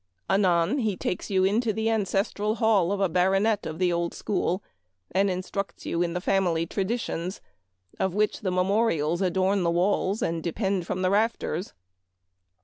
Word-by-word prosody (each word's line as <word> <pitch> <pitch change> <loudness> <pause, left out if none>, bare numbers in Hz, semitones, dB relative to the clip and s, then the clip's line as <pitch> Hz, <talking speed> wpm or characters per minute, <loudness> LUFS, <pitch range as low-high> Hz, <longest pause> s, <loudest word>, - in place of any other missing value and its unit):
Anon, 185 +5 +2
he 215 -6 -1
takes 180 - -3
you 190 -2 +2
into 220 +4 +2
the 220 +1 -3
ances 205 -3 +1
tral 210 +1 -1
hall 215 -6 +3
of 200 - -1
a 195 - +3
Baronet 195 +5 +2
of 155 - -5
the 180 0 +2
old 170 0 -1
school 190 -2 -1 0.5
and 195 +2 +2
instructs 185 +2 -4
you 170 - -1
in 170 -1 0
the 180 - -1
family 180 -4 +1
traditions, 190 -2 -3 0.6
of 190 -1 0
which 210 0 +1
the 190 - -1
memorials 180 -3 +1
adorn 190 +1 +1
the 170 - +1
walls 185 +3 +1
and 165 0 -1
de 170 - -2
pend 195 -4 -1
from 185 - -2
the 185 - +2
rafters. 205 -4 0
190 Hz, 170 wpm, -26 LUFS, 175-205 Hz, 0.6 s, hall